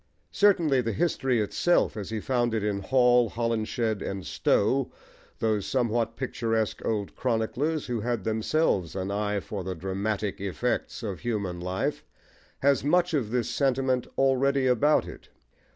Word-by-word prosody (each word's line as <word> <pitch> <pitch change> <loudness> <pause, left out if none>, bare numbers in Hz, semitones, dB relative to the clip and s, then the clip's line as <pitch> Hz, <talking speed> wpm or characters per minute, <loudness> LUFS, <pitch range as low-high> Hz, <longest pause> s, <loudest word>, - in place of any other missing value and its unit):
Certainly 170 -10 +3
the 115 -2 -2
history 135 - +1
itself, 175 +11 +1
as 105 -3 -5
he 110 -1 -2
found 120 0 0
it 110 - -1
in 105 -1 -1
Hall, 125 +2 +4
Holinshed, 115 -1 -1
and 95 -1 -4
Stowe, 130 +6 +1 0.5
those 110 -3 0
somewhat 115 -3 0
picturesque 115 -4 -2
old 105 -3 -2
chroniclers 130 +6 -1
who 120 -2 -2
had 120 -2 -2
themselves 110 - 0
an 95 0 -3
eye 105 0 -1
for 100 0 -6
the 95 0 -4
dramatic 95 +3 -3
"effects" 115 +5 -2
of 100 -6 -4
human 100 -7 -3
life, 90 +2 -2 0.6
has 140 0 +3
much 175 +4 +2
of 130 -8 0
this 120 0 0
sentiment 130 -2 +1
already 135 0 +2
about 130 +4 +3
it. - - -11
115 Hz, 145 wpm, -27 LUFS, 105-130 Hz, 0.6 s, Hall